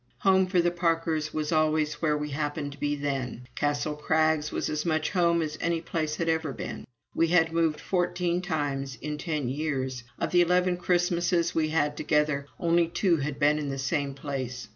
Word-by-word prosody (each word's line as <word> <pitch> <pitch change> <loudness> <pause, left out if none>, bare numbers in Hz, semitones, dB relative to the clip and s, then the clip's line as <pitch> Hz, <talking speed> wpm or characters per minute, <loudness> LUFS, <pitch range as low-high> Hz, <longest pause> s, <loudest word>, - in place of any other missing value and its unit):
Home, 190 -1 +4
for 185 -1 +2
the 175 0 +2
Parkers, 165 -2 0
was 155 0 -2
always 155 -1 +1
where 150 -2 +2
we 150 0 -4
happened 145 0 -2
to 140 - -12
be 145 0 0
then. 135 -4 -3
Castle 145 +3 -1
Crags 155 0 +1
was - - -2
as 150 0 -2
much 155 -2 0
"home" 170 -2 +3
as 155 0 -5
any 170 0 +1
place 160 -2 -2
had 165 - -2
ever 160 -3 0
been. - - -6 0.3
We 165 - +2
had 165 -1 +3
moved 165 -2 +1
fourteen 180 -1 0
times 145 -6 -2
in 150 +1 -4
ten 150 -6 -2
years: 130 -2 -2
of - - -2
the 175 - +5
eleven 180 +1 +2
Christmases 175 -1 +1
we 155 -1 +1
had 160 +1 +2
had 145 - -17
together, 150 -2 +1
only 170 0 +3
two 170 0 +2
had 140 0 -3
been 150 +1 +3
in 145 -2 -3
the 135 - -3
same 140 0 -1
place. 130 -4 -5
155 Hz, 195 wpm, -27 LUFS, 145-170 Hz, 0.3 s, the